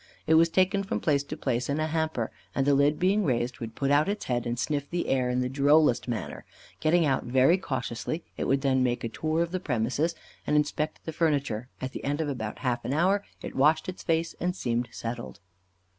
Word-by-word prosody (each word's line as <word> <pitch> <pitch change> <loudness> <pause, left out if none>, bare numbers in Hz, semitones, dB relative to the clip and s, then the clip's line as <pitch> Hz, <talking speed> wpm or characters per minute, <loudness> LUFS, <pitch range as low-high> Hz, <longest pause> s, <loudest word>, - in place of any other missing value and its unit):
It 160 - +3
was 165 +1 +6
taken 190 +3 +2
from 195 - -2
place 145 -3 +2
to 155 - -6
place 125 -3 -1
in 140 +2 0
a 155 - +1
hamper, 160 -7 -1 0.2
and 135 - +1
the 145 - +4
lid 145 +2 +3
being 195 +5 +2
raised 125 -4 -1
would 115 -1 -6
put 140 0 0
out 150 +5 +4
its 205 +1 -3
head 120 -1 -1
and 120 0 -2
sniff 145 +2 -2
the 175 0 -2
air 130 -2 +1
in 125 0 +1
the 125 - 0
drollest 140 0 +3
manner. 120 -3 -4 0.4
Getting 165 +1 +3
out 135 -2 +1
very 130 +9 +4
cautiously, 130 +1 -3
it - - -3
would 135 0 +2
then 130 -2 +2
make 125 -1 0
a 115 - -2
tour 155 +7 0
of 170 - -5
the 185 - -1
premises, 135 +3 0 0.3
and 150 - +2
inspect 150 +1 -1
the 160 - -4
furniture; 140 -8 0
at 130 0 -4
the - - -7
end 145 +2 -1
of 155 -2 -1
about 110 -6 -4
half 120 -1 0
an 130 - -2
hour 190 +5 +2 0.2
it - - -6
washed 155 +6 +3
its 185 - -6
face 165 0 0
and 180 +1 -1
seemed 120 -7 -1
settled. 115 -4 -6
145 Hz, 225 wpm, -27 LUFS, 125-160 Hz, 0.4 s, was